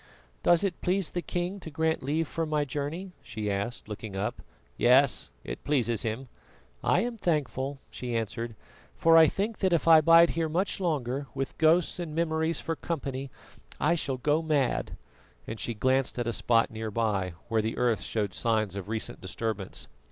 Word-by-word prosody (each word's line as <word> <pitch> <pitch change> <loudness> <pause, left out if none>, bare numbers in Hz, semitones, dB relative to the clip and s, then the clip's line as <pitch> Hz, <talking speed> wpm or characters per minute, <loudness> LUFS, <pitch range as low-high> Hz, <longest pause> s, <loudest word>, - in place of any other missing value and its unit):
"Does 175 +2 +4
it 190 -4 -2
please 185 -1 0
the 175 - -2
king 180 +3 -3
to 170 - -8
grant 160 +1 0
leave 155 +4 0
for 165 +4 -2
my 150 -1 +1
journey?" 150 +7 -4
she 105 -2 -4
asked, 100 +4 -3
looking 105 -1 -6
up. 105 +5 -3 0.3
"Yes, - - +4
it - - -6
pleases 120 -6 +1
him." 115 +3 -2 0.6
"I - - +3
am 240 0 -3
thankful," 145 - -1
she 120 -2 -4
answered, 115 +1 -3 0.4
"for 165 0 +5
I 160 -1 +9
think 205 +6 -2
that 190 -2 +2
if 165 - +1
I 160 -1 +9
bide 165 +2 +7
here 165 -1 -1
much 180 +6 0
longer, 140 -6 -1
with 135 -1 -3
ghosts 165 +2 +3
and 160 -3 -4
memories 160 -1 +1
for 165 - -3
company, 140 -5 -4 0.5
I 165 - +3
shall 140 -6 -1
go 150 +5 +1
mad," 140 - 0 0.5
and 110 - -6
she 120 - -2
glanced 130 +4 +1
at 120 - -1
a 115 - -1
spot 115 +1 +2
near 110 0 -4
by, 100 -5 0
where 115 -2 +1
the 110 +1 -3
earth 120 -3 +2
showed 105 -4 -2
signs 110 -2 0
of 100 0 -6
recent 110 0 -3
disturbance. 105 +1 -3
140 Hz, 180 wpm, -28 LUFS, 115-165 Hz, 0.6 s, I